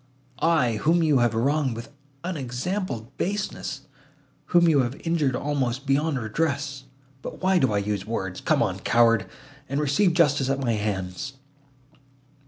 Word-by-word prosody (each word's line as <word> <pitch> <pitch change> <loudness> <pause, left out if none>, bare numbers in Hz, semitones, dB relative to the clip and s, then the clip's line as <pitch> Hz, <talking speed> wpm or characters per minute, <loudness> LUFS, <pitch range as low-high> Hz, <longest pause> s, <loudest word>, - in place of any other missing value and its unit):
I—whom 160 +1 +2
you 150 -4 +4
have 120 -2 +2
wronged 135 +1 +1
with 120 +5 -9 0.3
unexampled 135 - -3
baseness, 205 +3 -3 0.6
whom 175 -1 +4
you 155 -4 +4
have 125 +1 -1
injured 155 -6 +1
almost 135 -1 -1
beyond 140 +2 +1
redress! 140 +3 -2 0.4
But - - -8
why 190 -1 +4
do 130 -7 +2
I 105 - +1
use 100 0 -2
words?—Come 95 -5 0
on, - - -2
coward, 115 -3 +3 0.4
and 140 +2 -1
receive 150 +6 +2
justice 145 -5 +3
at 135 0 0
my 120 -4 0
hands!" 105 +2 -3
135 Hz, 135 wpm, -25 LUFS, 115-155 Hz, 0.6 s, you